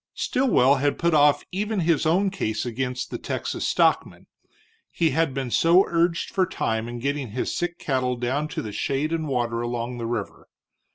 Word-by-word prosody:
Stilwell 145 - +3
had 145 +2 0
put 170 -1 +1
off 145 -1 +4
even 205 +1 -1
his 160 -1 +2
own 190 +4 +2
case 110 - -2
against 125 +1 -3
the - - -4
Texas - - -3
stockman, - - +1 0.7
he 165 -2 +1
had 160 +1 +1
been 130 -2 -4
so 175 +8 +5
urged 170 0 0
for 190 -4 +1
time 110 -10 -2
in 120 - -6
getting 140 0 -2
his 125 - -2
sick 175 0 -2
cattle 130 -2 -1
down 130 +5 -1
to - - -5
the 105 - -6
shade 140 +8 -1
and 160 -2 -2
water 120 -3 -1
along 120 +1 -3
the 115 - -3
river. 115 -4 -5
140 Hz, 180 wpm, -24 LUFS, 120-165 Hz, 0.7 s, so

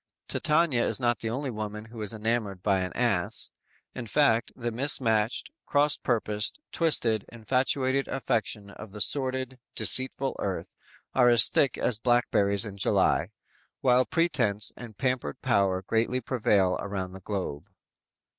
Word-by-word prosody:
"_ - - -51
Titania 155 -6 +2
is - - +1
not 120 -2 0
the 115 - -4
only 130 +3 -3
woman 105 -1 -6
who 115 0 -10
is 105 - -1
enamored 110 -4 -2
by 100 -2 +2
an 90 - -3
Ass; 110 -8 -1 0.4
in 120 -3 -7
fact 115 -2 +2
the 120 -2 -4
mismatched, 115 -3 +1 0.2
cross 145 0 +2
purposed, 105 - -1
twisted, 120 - +2
infatuated 130 +3 0
affections 110 -6 -2
of 110 -3 -10
the 105 - -8
sordid, 130 +1 0 0.2
deceitful 130 +1 +1
earth 95 -2 -4 0.4
are 125 -2 +5
as 120 -3 +7
thick 135 - +1
as 115 -3 +2
blackberries 110 -4 +2
in 100 -2 -8
July, 95 - +1 0.5
while 125 0 +4
pretense 125 - +1
and 115 -4 -11
pampered 125 - -2
power 95 -1 +1
greatly 115 +5 0
prevail 105 -7 +1
around 95 -2 -4
the 95 - -10
globe. 95 -4 -5
115 Hz, 145 wpm, -27 LUFS, 105-130 Hz, 0.5 s, as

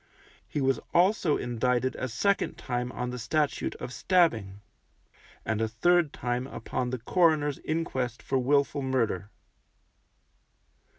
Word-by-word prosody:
He 145 - -2
was 135 -2 +2 0.2
also 180 -3 +3
indicted 125 +1 0
a 130 - -3
second 200 - 0
time 125 -1 -3
on 125 -1 -3
the 125 - -5
Statute 145 +5 -1
of 125 +1 -7
Stabbing, 115 - +1 0.8
and 110 -1 -1
a 110 - +2
third 165 +8 +2
time 125 +1 -2
upon 125 -2 -3
the 130 - -2
coroner's 150 +2 +2
inquest 130 -7 -2
for 135 - 0
wilful 140 +2 +2
murder. 115 -7 -1
130 Hz, 125 wpm, -28 LUFS, 120-155 Hz, 0.8 s, also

